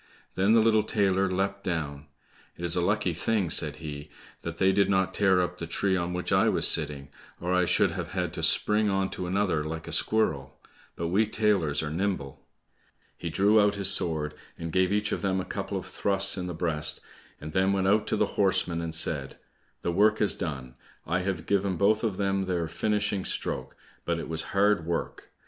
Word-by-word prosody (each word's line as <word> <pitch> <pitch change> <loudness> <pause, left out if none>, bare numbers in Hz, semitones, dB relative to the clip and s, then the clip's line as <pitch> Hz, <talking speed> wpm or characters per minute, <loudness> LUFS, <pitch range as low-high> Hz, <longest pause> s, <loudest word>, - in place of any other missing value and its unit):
Then 95 +4 +2
the 115 - +5
little 110 -1 +3
tailor 95 -3 +1
leapt 100 +1 -2
down. 75 -4 -4 0.5
"It 85 - -5
is 85 0 0
a 90 - +1
lucky 100 0 0
thing," 95 0 -1
said - - +1
he, 75 -1 -8 0.3
"that 85 0 -6
they 95 0 +3
did 100 0 +2
not 95 -1 +1
tear 95 -2 +3
up 90 0 -4
the 85 - -5
tree 95 +3 0
on 85 -1 -2
which 90 0 -4
I - - +3
was - - +2
sitting, 75 -2 +2 0.3
or 90 +1 -2
I 90 0 +3
should - - +2
have - - -6
had - - -2
to - - -5
spring 105 0 +3
on 95 -1 -1
to 90 - -5
another 95 -4 0
like 80 +1 -6
a - - -6
squirrel; 70 -12 +3 0.4
but 85 0 -3
we 105 +5 +2
tailors 100 -10 0
are 75 - -4
nimble." 85 -5 -3 0.7
He 85 - -6
drew 100 +5 +3
out 105 0 +2
his 100 -1 +5
sword 80 -5 +1 0.2
and 85 -1 -6
gave 95 0 +2
each 105 0 0
of - - -2
them 95 -1 0
a 95 - -4
couple - - -4
of - - -6
thrusts 100 -1 +1
in 90 -1 -4
the 90 - -5
breast, 80 -3 -2 0.4
and 75 +1 -8
then 95 +3 +2
went 95 -1 0
out 105 +2 +2
to - - 0
the 105 - +2 0.2
horsemen 90 -3 +1
and 80 -1 -2
said, 75 -4 -1 0.5
"The 85 - -1
work 105 +4 +3
is 105 - +3
done; 65 -6 -5 0.3
I 85 +4 0
have 90 -4 -3
given 100 -2 0
both 105 +4 +2
of 105 -5 -1
them 95 -1 0
their 90 -3 -2
finishing 105 +3 -1
stroke, - - -3 0.3
but 85 -1 -1
it 85 - -6
was 80 0 -3 0.2
hard 100 -3 +3
work! 85 +1 -4
95 Hz, 205 wpm, -27 LUFS, 80-100 Hz, 0.7 s, the